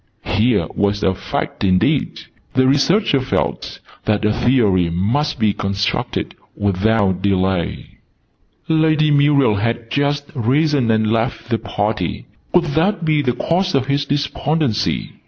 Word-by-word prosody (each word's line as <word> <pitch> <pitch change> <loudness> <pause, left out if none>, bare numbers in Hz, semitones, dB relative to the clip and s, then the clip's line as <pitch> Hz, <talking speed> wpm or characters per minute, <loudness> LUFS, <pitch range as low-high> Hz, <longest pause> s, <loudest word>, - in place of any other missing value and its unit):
Here 110 +2 +1
was 100 0 0
a 95 - +2
Fact - - -4
indeed! 95 -1 +1 0.3
The 130 0 +4
Researcher 145 +4 +2
felt 80 - -3 0.3
that 105 0 0
a 105 - +2
Theory 110 -8 +2
must 120 - -1
be 110 -4 +1
constructed 100 0 -2 0.2
without 100 -1 +1
delay. 95 -3 -1 0.7
Lady 155 -1 +2
Muriel 140 -6 +3
had 115 +2 -2
just 145 0 -1
risen 135 +1 +1
and 110 -1 +2
left 115 +1 -2
the 115 - +1
party. 105 -3 -3 0.3
Could 180 - +3
that 175 +3 +1
be 155 -2 +2
the 125 -3 0
cause 180 +8 0
of 135 -2 +1
his 140 +1 0
despondency? 145 -3 -1
120 Hz, 130 wpm, -18 LUFS, 100-145 Hz, 0.7 s, The